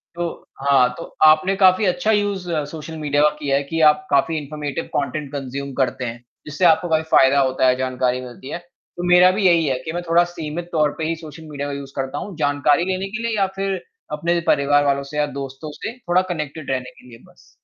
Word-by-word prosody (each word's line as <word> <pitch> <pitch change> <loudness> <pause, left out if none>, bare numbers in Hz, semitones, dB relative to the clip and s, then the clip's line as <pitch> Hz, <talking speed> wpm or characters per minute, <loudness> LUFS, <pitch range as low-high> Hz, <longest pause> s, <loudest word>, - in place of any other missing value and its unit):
तो, 175 -1 -5 0.2
हाँ 130 -3 +5
तो - - -6 0.2
आपने 155 +5 +5
काफ़ी 190 +1 +4
अच्छा 180 +4 +1
यूज़ 200 -4 0 0.2
सोशल 160 0 -8
मीडिया 145 -1 0
का 150 - +6
किया 140 -2 0
है 140 - -1
कि 165 +3 -3
आप 150 0 -8
काफ़ी 150 +3 +2
इन्फॉर्मेटिव 150 -1 -5
कंटेंट 145 0 -2
कंज़्यूम 140 0 -5
करते 130 -1 -1
हैं, 120 +1 -6 0.2
जिससे 155 +4 -1
आपको 170 +1 +4
काफ़ी 160 0 +2
फ़ायदा 135 +1 +5
होता 130 -1 +2
है, 125 - +4
जानकारी 130 -1 -1
मिलती 125 +2 -10
है। - - -3
तो 175 0 -12
मेरा 180 +1 +7
भी 195 0 -1
यही 170 -3 +4
है 130 -2 0
कि 160 - -3
मैं 175 - -2
थोड़ा 170 +1 +5
सीमित 165 +2 -5
तौर 155 -3 +2
पे 160 - -4
ही 165 - -1
सोशल 160 0 -11
मीडिया 145 0 -4
का 140 - -4
यूज़ 140 -1 -8
करता 135 -1 -3
हूँ, 200 - -6
जानकारी 145 +2 +2
लेने 190 +1 -2
के 230 - -4
लिए 220 -2 -1
या 195 - +2
फिर 195 -1 -2 0.3
अपने 170 +3 0
परिवार 145 +1 +3
वालों 140 0 +1
से 150 - -4
या 150 - +2
दोस्तों 135 +3 -7
से 225 +10 -7
थोड़ा 180 -6 +1
कनेक्टेड 150 -2 -5
रहने 130 -1 -3
के - - -19
लिए 115 - -12
बस। - - -23
150 Hz, 225 wpm, -21 LUFS, 140-175 Hz, 0.3 s, मेरा